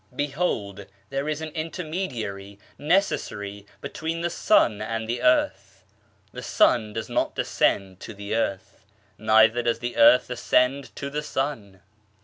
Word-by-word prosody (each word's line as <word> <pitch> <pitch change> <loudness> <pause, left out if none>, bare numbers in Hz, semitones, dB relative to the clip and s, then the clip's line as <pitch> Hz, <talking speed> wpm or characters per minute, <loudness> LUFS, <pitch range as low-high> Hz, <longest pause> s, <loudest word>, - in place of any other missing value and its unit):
Behold, 125 - -2 0.2
there 140 +2 -2
is 155 0 -2
an 160 - -4
intermediary 155 - -5 0.2
necessary 105 - -1
between 165 +1 -4
the 175 0 -1
sun 110 - +3
and 115 +1 -3
the 120 +1 -2
earth; 125 0 +1 0.5
the - - -8
sun 110 -3 +2
does 110 +1 -5
not - - -1
descend 95 -2 0
to - - -8
the 100 +1 -5
earth, 100 -4 -3 0.4
neither 110 +2 +4
does 115 -1 0
the 120 +1 -5
earth 125 +2 +6
ascend 125 +2 +1
to 140 0 -5
the 150 +1 -2
sun. 115 -11 -4
120 Hz, 135 wpm, -25 LUFS, 105-150 Hz, 0.5 s, earth